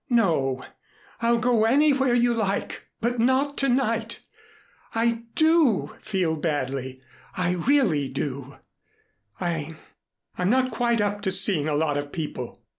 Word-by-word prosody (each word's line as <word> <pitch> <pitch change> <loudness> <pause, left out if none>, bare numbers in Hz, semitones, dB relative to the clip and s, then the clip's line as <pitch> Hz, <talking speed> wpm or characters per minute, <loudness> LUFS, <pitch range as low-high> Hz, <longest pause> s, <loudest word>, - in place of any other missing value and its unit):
"No 160 - +1 0.6
I'll 235 0 +3
go 230 -1 +2
anywhere 270 0 +3
you 240 0 +3
like, 205 -3 -3
but 240 +1 -1
not 260 +4 +2
to 275 - +2
night. 230 -3 0 0.8
I 230 0 0
do 315 - +3
feel 180 -6 -1
badly. 135 -4 -3 0.3
I 180 -1 +1
really 180 - +1
do. 135 0 -5 0.8
I 160 -3 -3 0.6
I'm 180 +1 +1
not 255 +2 +2
quite 235 -1 +1
up 205 0 -1
to 190 - 0
seeing 185 -5 +2
a 150 - 0
lot 150 -1 0
of 145 0 -4
people. 150 -7 -6
205 Hz, 130 wpm, -25 LUFS, 155-240 Hz, 0.8 s, I'll